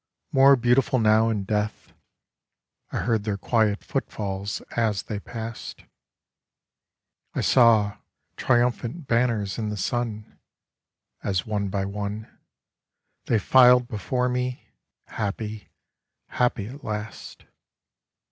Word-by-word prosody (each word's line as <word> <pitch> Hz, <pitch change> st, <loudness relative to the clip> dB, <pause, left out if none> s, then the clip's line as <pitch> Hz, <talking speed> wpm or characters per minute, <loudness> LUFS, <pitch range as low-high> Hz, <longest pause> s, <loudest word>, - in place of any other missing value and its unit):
More 135 Hz, +1 st, +7 dB
beautiful 125 Hz, +1 st, +2 dB
now 110 Hz, 0 st, +4 dB
in 105 Hz, -3 st, -1 dB
death; 105 Hz, +1 st, -3 dB, 1.0 s
I -, -, -3 dB
heard 115 Hz, -4 st, 0 dB
their 105 Hz, -2 st, -2 dB
quiet 105 Hz, 0 st, +1 dB
footfalls 100 Hz, -1 st, -3 dB
as 110 Hz, -4 st, 0 dB
they 105 Hz, -2 st, -5 dB
passed, 115 Hz, +1 st, -7 dB, 1.5 s
I -, -, 0 dB
saw 110 Hz, -5 st, +4 dB, 0.4 s
triumphant 120 Hz, +4 st, 0 dB
banners 115 Hz, -4 st, 0 dB
in 110 Hz, -2 st, -2 dB
the 105 Hz, -, -4 dB
sun 110 Hz, 0 st, -3 dB, 0.8 s
As 95 Hz, 0 st, -1 dB
one 105 Hz, -2 st, -1 dB
by 95 Hz, 0 st, -1 dB
one 105 Hz, +2 st, -4 dB, 1.0 s
They 115 Hz, -, +2 dB
filed 125 Hz, +3 st, +6 dB
before 125 Hz, +4 st, -1 dB
me, 125 Hz, 0 st, -2 dB, 0.4 s
happy, 105 Hz, +1 st, -5 dB, 0.6 s
happy 120 Hz, -4 st, 0 dB
at 135 Hz, +7 st, -10 dB
last. 105 Hz, 0 st, -6 dB
110 Hz, 105 wpm, -25 LUFS, 105-120 Hz, 1.5 s, More